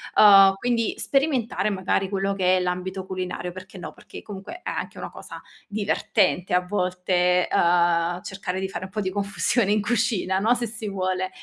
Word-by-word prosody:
uhm, 195 -2 +8
quindi 230 +1 -1
sperimentare 270 -7 0
magari 190 0 -1
quello 195 0 -1
che 185 -1 +2
è - - +1
l'ambito 180 +1 -3
culinario, 185 -1 -4
perché 185 +2 -11
no, 180 - -8
perché - - -12
comunque 205 - -9
è - - -3
anche - - -5
una - - -6
cosa - - -10 0.3
divertente 200 -3 0
a 180 - +4
volte, 180 -1 +1
uhm, 175 0 +2
cercare 190 -1 -4
di 190 - -2
fare 190 -1 -6
un 190 - -12
po' 210 - -2
di 190 -2 -2
confusione 205 +2 0
in 210 0 +2
cucina, 205 -4 0
no, 225 +5 +3
se 240 - -2
si 220 -1 -6
vuole. 185 -1 -2
190 Hz, 180 wpm, -24 LUFS, 180-210 Hz, 0.3 s, uhm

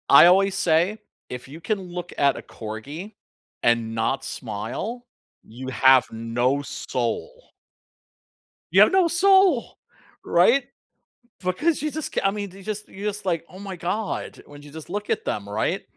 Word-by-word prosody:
I 140 - +9
always 195 +2 +5
say, 175 +4 +2 0.3
if 125 +1 -7
you 155 +5 -11
can 215 +3 -1
look 175 0 -6
at 140 -1 +3
a - - -6
corgi 140 - -8 0.5
and 115 -1 +2
not 115 +4 0
smile, 125 - -5 0.4
you 125 +4 -9
have 130 -1 +5
no 120 +5 0
soul. 145 - -4 1.2
You - - +5
have - - +7
no 375 -3 +4
soul, 375 -5 +4 0.5
right? 235 +10 +4 0.8
Because 285 - 0
you 305 0 -1
just 315 0 -5
c - - +1
I 195 - +3
mean, 205 -1 -4
you 195 +1 -13
just 210 +1 -5
you're 205 +2 -4
just 210 0 -7
like, 170 -3 -1
"Oh 185 - -11
my 195 -1 -6
god", 200 +5 -3
when 145 0 -13
you 145 - -13
just 160 +1 -10
look 205 +3 -4
at - - -1
them, 100 -1 -3
right? 105 +2 -1
175 Hz, 160 wpm, -24 LUFS, 130-210 Hz, 1.2 s, I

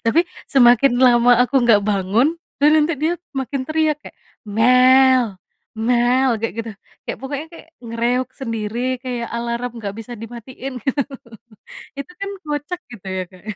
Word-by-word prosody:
Tapi, 230 +9 +4 0.3
semakin 245 -1 +6
lama 240 -1 +5
aku 250 +2 -3
nggak 220 -3 +5
bangun, 205 +7 +2 0.3
dan 295 +1 +6
nanti 310 +2 +2
dia 320 +2 +2 0.3
makin 270 +1 -3
teriak 310 -1 +1
kayak, - - -13 0.4
"mel! 255 +2 +6 0.6
mel!" 250 +2 +3
kayak 230 - -2
gitu, 230 0 -4 0.3
kayak - - -5
pokoknya 280 +3 -5
kayak 330 - -13 0.2
nge-reog 235 +2 -1
sendiri, 230 -2 -4 0.2
kayak 245 -2 -4
alarm 235 +1 -3
nggak 200 -3 -5
bisa 225 +2 -8
dimatiin 240 +4 -8 1.2
gitu 280 +5 -7
kan 395 0 -4
kocak 300 +4 -4
gitu 200 -5 -11
ya, 185 - -1
Kak, 185 -1 -16
ya. 215 - -4
245 Hz, 145 wpm, -20 LUFS, 230-275 Hz, 1.2 s, semakin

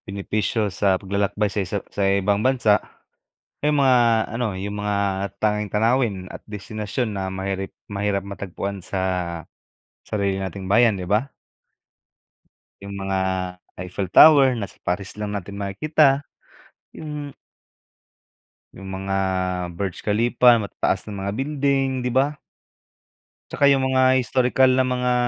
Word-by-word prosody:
Benepisyo 105 +1 -2
sa 95 -1 +2
paglalakbay 100 +2 -1
sa 105 - 0
isa 95 +2 -3 0.2
sa - - -3
ibang 100 +1 +1
bansa, 120 -4 +3 0.8
yung 150 -1 +2
mga 120 -4 +4
ano 120 -3 -1
yung 100 +1 -4
mga 105 0 -1 0.4
tanging 105 -1 0
tanawin 115 +1 +2
at - - -10
destinasyon 105 +2 -4
na 95 -1 -3
mahirap 95 0 -4 0.2
mahirap 100 0 -1
matagpuan 100 -1 -5
sa 95 - -3 1.0
sarili 100 -2 -2
nating 95 0 -5
bayan 110 +2 +4
'di 90 - -5
ba? 105 +9 0 1.5
Yung 100 0 -7
mga 95 0 -2 0.6
Eiffel 90 +1 -4
Tower 135 +1 +7
na 105 - -2
sa - - -18
Paris 95 +2 -3
lang 105 -1 -4
natin 100 +1 -8
makikita. 140 +7 +2 0.7
Yung 150 -2 -7 1.4
Yung 95 +1 -11
mga 95 0 -3 0.6
Burj 95 -1 -4
Khalifa 120 +3 +4
matataas 100 -3 -1
na - - -6 0.2
mga - - -1
building 140 0 0 0.2
'di - - -1
ba? 140 +4 +1 1.1
Tsaka 140 - +3
yung 135 -1 +4
mga 130 0 +3
historikal 130 0 +3
na 130 0 +2
mga 125 0 0
105 Hz, 130 wpm, -22 LUFS, 100-130 Hz, 1.5 s, Tower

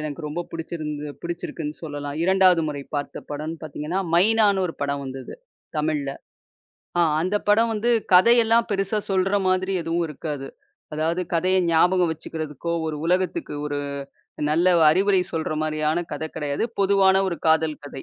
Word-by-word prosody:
எனக்கு 150 0 -5
ரொம்ப 150 +4 -4
புடிச்சிருந்தது 150 -3 -5
புடிச்சிருக்குன்னு 165 -3 -5
சொல்லலாம். 145 -2 -5
2ஆவது 185 -1 +4
முறை 145 -1 -5
பார்த்த 145 -1 -4
படம்ன்னு 155 +2 -5
பாத்தீங்கன்னா, 155 +4 -4 0.2
மைனான்னு 200 +1 +4
ஒரு 165 - -6
படம் 140 0 -2
வந்தது, 130 0 -7 0.4
தமிழ்ல. 150 -2 -1 0.9
ஆ - - +5 0.2
அந்தப் 195 +5 -1
படம் 225 +2 +4
வந்து 225 +3 0 0.2
கதை 210 +7 +7
எல்லாம் 230 +1 +3
பெருசா 195 +1 0
சொல்ற 195 +1 +2
மாதிரி 185 +1 +1
எதுவும் 170 +1 -1
இருக்காது. 145 -2 -5 0.5
அதாவது 160 +3 0
கதையை 185 +3 +3
ஞாபகம் 175 +1 +3
வச்சுக்கிறதுக்கோ, 160 0 -5
ஒரு 155 -1 -3
உலகத்துக்கு 185 - 0
ஒரு 145 -1 -3 0.7
நல்ல 175 +3 +4 0.2
அறிவுரை 195 +2 +3
சொல்ற 160 -1 -2
மாரியான 155 +2 0
கதை 160 +2 -3
கெடையாது. 145 +1 -1 0.2
பொதுவான 195 -1 +4
ஒரு 170 - -3
காதல் 160 -1 +2
கதை. 135 - -8
165 Hz, 145 wpm, -23 LUFS, 150-190 Hz, 0.9 s, கதை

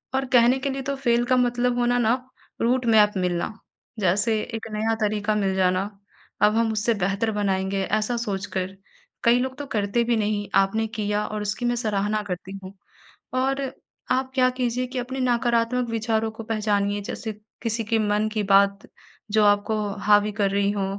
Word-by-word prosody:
और 270 0 +1
कहने 245 +1 +6
के 275 +1 -2
लिए 270 0 -3
तो 280 +1 -3
फ़ेल 240 -3 +1
का 255 +1 +2
मतलब 245 0 +1
होना 245 0 +2
ना 225 0 +3 0.5
रूटमैप 230 -4 +4
मिलना, 180 -2 -1 0.5
जैसे 205 +4 +2
एक 225 -2 -6
नया 215 +1 0
तरीक़ा 210 0 0
मिल 195 -2 0
जाना, 185 0 +2 0.6
अब 210 +1 +4
हम 230 0 +2
उससे 215 +2 +1
बेहतर 200 +2 0
बनाएँगे, 195 -2 -1
ऐसा 215 +4 0
सोचकर, 195 -3 -3 0.5
कई 235 +1 +5
लोग 260 +1 -3
तो 290 - -5
करते 205 +3 +1
भी 235 0 +1
नहीं 205 -1 -1
आपने 220 +3 +2
किया 210 0 0
और 215 -1 -4
उसकी 210 +4 -3
मैं 240 0 +1
सराहना 215 -2 0
करती 190 +1 -5
हूँ। 190 +1 -9 0.6
और 270 +2 0 0.5
आप 260 +1 +1
क्या 255 -1 +4
कीजिए 250 0 0
कि 255 0 -4
अपने 260 +2 -4
नकारात्मक 240 -1 +1
विचारों 225 -1 0
को 220 +1 -9
पहचानिए 205 -2 0
जैसे 220 +2 -5 0.3
किसी 230 0 -1
के 225 0 +1
मन 210 0 +1
की 215 -1 0
बात, 200 0 +4 0.5
जो 215 0 +4
आपको 205 +1 +2 0.3
हावी 210 0 +5
कर 200 -1 0
रही 200 0 +1
हो 200 -2 -1
215 Hz, 175 wpm, -24 LUFS, 205-240 Hz, 0.6 s, कहने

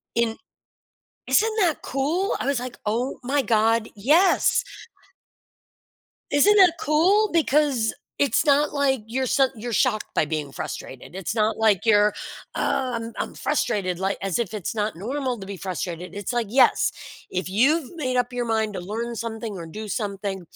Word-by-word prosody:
In 230 -1 +1 0.9
isn't 440 +1 +3
that 340 -5 +1
cool? 310 +9 -1
I - - -3
was 280 -2 +1
like, 250 0 -7
"Oh 235 +5 -1
my 275 +3 +1
god. 225 -1 +2
Yes!" 330 - +3 1.7
Isn't 395 +9 +5
that 360 -4 +6
cool? 375 +8 +3
Because 290 -7 +2 0.3
it's 285 +3 +2
not 290 +1 +3
like 275 -4 +1
you're 260 +4 -1
so 270 +1 +3
you're 235 +2 -6
shocked 220 -2 +1
by - - +2
being 150 -2 -3
frustrated. 135 +4 -7
It's 190 +1 -3
not 220 -1 +1
like 220 -4 +2
you're, 210 -2 +4 0.4
"Ugh, 250 -3 -1
I'm 230 0 -8
I'm - - -3
frustrated." 185 -4 -1
Like, 195 +2 -1
as 195 -3 -1
if 225 -3 -2
it's 210 0 -4
not 210 -2 -1
normal 250 - -3
to 195 - -8
be 200 - -5
frustrated. 180 -1 -5
It's 205 +3 -4
like, 240 -2 0
"Yes. 255 +3 +4 0.4
If 185 0 -2
you've 270 - +2
made 255 -6 -1
up 245 0 0
your 245 -1 -2
mind 220 -2 0
to 185 - -5
learn 230 +6 -4
something 225 -2 -5
or 170 -3 -7
do 215 +7 -7
something" 200 -2 -3
230 Hz, 165 wpm, -24 LUFS, 205-275 Hz, 1.7 s, that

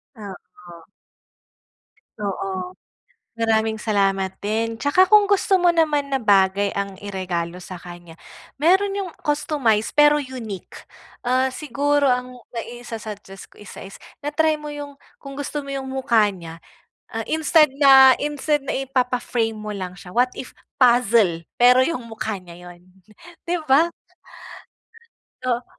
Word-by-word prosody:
Oo. 180 -4 -12 1.4
Oo. 190 -2 -4 0.6
Maraming 220 -1 0
salamat 195 -3 0
din. 225 +2 -2
Tsaka 360 +9 +3
kung 425 -1 +6
gusto 390 -1 +2
mo 350 -1 +3
naman 305 -3 +1
na 265 - 0
bagay 200 -1 +3
ang 200 -1 -3
iregalo 180 -3 -4
sa 180 -1 -10
kanya, 175 -1 -11 0.5
meron 385 +5 +3
yung 395 -2 -3 0.2
customized 290 -7 0
pero 295 0 +5
unique. 235 -8 -8 0.4
Uh, 255 +2 +2
siguro 290 +1 0
ang 250 0 -5 0.2
maisa-suggest 225 -4 -8
ko - - -23
isa 205 - -11
is 195 - -10 0.2
na-trymo 300 +1 0
yung 290 -1 -7 0.2
kung 275 -1 -10
gusto 285 0 -5
mo 275 - -6
yung 270 -1 -5
mukha 245 -5 +2
niya, 165 -4 -10 0.5
uh, 225 - -3
instead 315 -2 +3
na, 265 -1 +8
instead 295 0 -1
na 275 - -4
ipapa-frame 250 -4 -1
mo 215 0 -6
lang 185 -2 -6
siya, 180 0 -12
what 250 +1 +3
if 260 - -8 0.2
puzzle, 235 -8 +3 0.2
pero 250 +1 +6
yung 260 -4 -1
mukha 220 -2 -4
niya 180 -1 -13
yun 175 0 -15 0.7
'di 350 - 0
ba? 295 +6 +4 1.6
Oo. 240 0 0
240 Hz, 130 wpm, -22 LUFS, 200-285 Hz, 1.6 s, na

